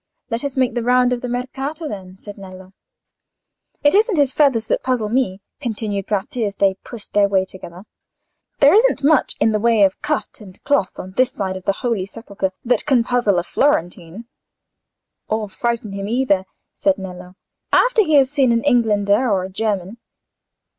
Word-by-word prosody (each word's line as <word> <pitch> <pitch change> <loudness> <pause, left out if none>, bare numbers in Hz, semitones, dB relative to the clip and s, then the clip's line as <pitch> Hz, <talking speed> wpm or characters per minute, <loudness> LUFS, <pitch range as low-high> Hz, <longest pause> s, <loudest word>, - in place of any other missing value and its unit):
"Let 230 +3 -2
us 280 -2 -4
make 255 -3 +2
the 240 - -1
round 250 +1 +3
of 245 - -3
the 250 - -4
Mercato, 270 +6 -4
then," 190 -5 -8
said 205 +1 -10
Nello. 190 -1 -12 1.1
"It 290 - +4
isn't 425 -1 +3
his 280 -3 +2
feathers 270 -7 +2
that - - 0
puzzle 245 -5 -1
me," 210 -5 0 0.2
continued 215 -6 -3
Bratti, 210 +3 -2
as 205 -2 -2
they 195 -1 +2
pushed 235 -4 -10
their 205 -1 +4
way 190 -1 +2
together. 185 -1 -11 0.8
"There 285 +3 +7
isn't 445 - +3
much 295 -1 +3
in 220 - +3
the 215 - 0
way 225 -1 +3
of 190 -1 +1
cut 300 -5 -3
and 190 -3 -13
cloth 285 -10 0
on 185 - -8
this 255 +6 +1
side 190 -5 -4
the - - +1
Holy 215 -6 -1
Sepulchre 200 -3 -5
that 245 +1 +1
can 260 -5 +3
puzzle 240 -6 +1
a 175 - +1
Florentine." 180 - -1 1.0
"Or 215 0 -2
frighten 230 0 -3
him 195 0 -5
either," 220 -5 +1 0.3
said 295 -1 +1
Nello, 180 -1 -9 0.4
"after - - +4
he 315 -5 +1
has 270 -1 +4
seen 275 -4 +2
an 230 0 +1
Englander 225 -3 +2
or 195 -3 +1
a 190 - -6
German." 205 +1 -3
225 Hz, 180 wpm, -20 LUFS, 195-260 Hz, 1.1 s, There